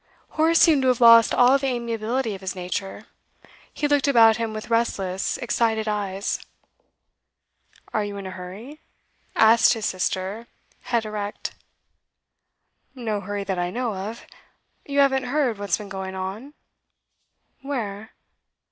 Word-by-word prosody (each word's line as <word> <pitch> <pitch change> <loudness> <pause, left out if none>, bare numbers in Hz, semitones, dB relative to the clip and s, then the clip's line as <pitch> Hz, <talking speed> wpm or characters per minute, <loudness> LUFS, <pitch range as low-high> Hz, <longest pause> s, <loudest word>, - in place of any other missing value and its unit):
Horace 325 +1 +2
seemed 310 -5 +5
to 260 - +1
have 250 -2 +2
lost 230 -1 +7
all 250 +3 +5
the 275 - -2
amiability 235 -1 -2
of 195 - -8
his 190 0 -4
nature; 185 +2 -5 0.7
he 295 - -1
looked 290 -1 +2
about 225 -4 +6
him 230 -1 -2
with 215 +2 -7
restless, 195 -5 0
excited 230 -3 0
eyes. 200 -2 -2 1.5
'Are 215 - +1
you 205 -1 -5
in 200 - -7
a 190 - -6
hurry?' 195 +11 -9 0.6
asked 230 +2 +6
his 225 -3 -4
sister, 190 +4 -2 0.4
head 235 -2 0
erect. 210 -1 -5 1.4
'No 220 -5 -3
hurry 205 +1 -4
that 190 -2 -3
I 175 0 -1
know 240 +2 -2
of. 205 +5 -6 0.6
You 280 0 -3
haven't 265 -2 +2
heard 250 -5 0
what's 200 -4 0
been 210 - -9
going 190 0 -6
on?' 200 +10 -6 1.1
'Where? 220 -6 -5
220 Hz, 140 wpm, -23 LUFS, 200-250 Hz, 1.5 s, lost